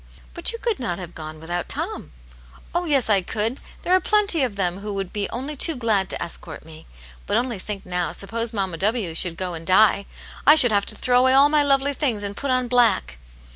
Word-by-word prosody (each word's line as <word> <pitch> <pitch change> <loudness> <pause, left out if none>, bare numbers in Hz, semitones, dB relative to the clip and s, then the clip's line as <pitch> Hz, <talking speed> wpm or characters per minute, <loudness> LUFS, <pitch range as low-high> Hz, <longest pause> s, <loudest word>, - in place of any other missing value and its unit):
But 345 - +2
you 465 - -6
could 465 -2 -2
not 180 -9 -3
have 175 -2 -9
gone 155 -1 -9
without 175 +2 -5
Tom." - - -4 0.3
" 60 +1 -23
Oh, 350 +1 -1
yes, 280 -6 +1
I 205 -3 +3
could! 220 +7 -3 0.2
There 360 - +1
are 370 - +5
plenty 405 -5 +2
of 245 -6 -1
them 185 -1 -2
who 210 +1 -6
would 195 -2 -5
be 205 -1 -2
only 270 +5 -5
too 320 +3 +1
glad 215 -6 0
to - - -3
escort 170 -2 -7
me. 160 -1 -14 0.4
But - - +1
only 240 -5 -2
think 200 +1 -7
now, 180 -1 -2
suppose 230 +3 -4
Mamma 190 -6 -3
W. 205 -2 -1
should 165 0 -1
go 185 -1 -3
and 165 -1 -7
die! 200 +1 +3 0.4
I 300 - +9
should 250 -7 +9
have 200 -1 +1
to - - 0
throw 250 -1 +2
away 260 +1 +4
all 275 +2 +6
my 300 0 +3
lovely 280 0 +2
things, 250 -8 -1
and 200 0 -5
put 280 - -5
on 255 -1 +1
black." 230 - +1
215 Hz, 230 wpm, -22 LUFS, 180-265 Hz, 0.4 s, I